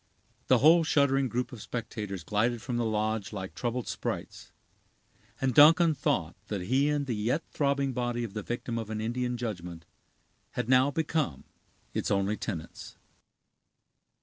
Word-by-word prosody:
The - - +6
whole 165 +3 +6
shuddering 140 -3 +3
group 125 +2 -2
of 120 -4 -9
spectators 105 -6 -5
glided 110 +6 0
from 120 +2 -3
the 120 - 0
lodge 110 -1 -1
like 95 -3 -6
troubled 120 0 -3
sprites; - - -5 0.9
and 135 -1 +1
Duncan 165 +4 +7
thought 135 - -1
that 100 -3 -3
he 130 +10 +2
and 145 -1 0
the 125 - -2
yet 120 +10 0
throbbing 140 -2 0
body 120 -1 -1
of 110 -4 -6
the 105 - -3
victim 120 +1 -3
of 110 -2 -6
an 110 -1 -3
Indian 125 +2 -2
judgment 90 -8 -5 0.7
had - - -2
now 130 +2 +5
become 150 - -1 0.5
its - - -1
only 100 +1 +1
tenants. 80 -6 -7
120 Hz, 150 wpm, -29 LUFS, 105-135 Hz, 0.9 s, Duncan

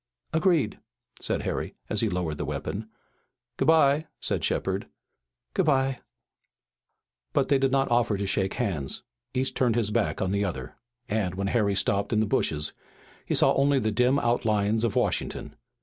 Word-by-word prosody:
"Agreed," 160 - +2 0.4
said - - -1
Harry, - - -3
as 105 - +1
he 115 - +1
lowered 90 -5 -2
the - - -1
weapon. 110 +2 -4 0.7
"Good - - 0
bye," 155 -1 +4
said - - -1
Shepard. - - -1 0.7
"Good 190 -4 +1
bye." 135 -2 +2 1.3
But - - +2
they 140 -1 +4
did 135 -1 +2
not 135 -1 +1
offer 120 -3 +2
to 100 - -2
shake 95 0 0
hands. 85 - -1 0.3
Each 130 +1 0
turned 120 -4 +2
his 110 -3 +1
back 110 0 0
on 95 - 0
the 100 0 +1
other, 65 -11 -4 0.3
and, 105 -5 -1
when 100 +1 -1
Harry 105 -4 +2
stopped 100 +2 +1
in 110 - +2
the 110 - +3
bushes, 75 -6 0 0.5
he - - +1
saw - - +5
only 140 +1 +3
the 110 -4 +1
dim 125 +5 +3
outlines 110 -3 +1
of 115 - 0
Washington. - - -1
110 Hz, 165 wpm, -27 LUFS, 100-135 Hz, 1.3 s, saw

